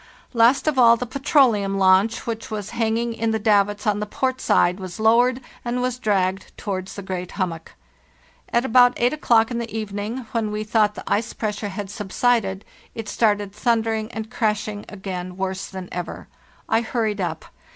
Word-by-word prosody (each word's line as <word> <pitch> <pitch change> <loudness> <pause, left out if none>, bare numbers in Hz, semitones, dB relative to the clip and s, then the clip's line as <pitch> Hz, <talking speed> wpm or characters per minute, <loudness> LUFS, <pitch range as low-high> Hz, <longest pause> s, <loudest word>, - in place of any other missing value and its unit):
Last 235 +3 +4
of 295 -4 +2
all, 235 -1 +7
the 250 - -3
petroleum 245 -7 +2
launch, 195 +4 +3
which 230 -2 -4
was 210 -2 -5
hanging 230 0 0
in 230 0 -1
the 220 - +1
davits 205 -1 +2
on 210 -1 +1
the 210 - -3
port 260 +4 -2
side, 180 +2 +3
was 185 -1 -7
lowered, 240 +3 +4 0.2
and 240 +1 -2
was 250 0 -1
dragged 195 -3 -1
towards 190 -2 -4
the 200 - -7
great 180 -1 -5
hummock. 170 -4 -4 0.8
At 235 +2 +2
about 245 0 +5
8 245 +3 +3
o'clock 230 -6 +3
in 235 - -2
the 235 -1 -4
evening, 215 +3 -4
when 225 -2 -1
we 210 0 -3
thought 215 -1 +2
the - - -7
ice 215 +2 -1
pressure 210 -1 -3
had 195 0 -6
subsided, 210 -1 0 0.3
it 225 -2 -5
started 205 -3 +1
thundering 225 0 0
and 220 0 -6
crashing 210 -3 -1
again 185 -3 -6
worse 190 0 -3
than 190 -2 -7
ever. 180 0 -6 0.4
I 225 - +2
hurried 220 -3 -1
up. 165 -3 -3
215 Hz, 175 wpm, -22 LUFS, 195-235 Hz, 0.8 s, all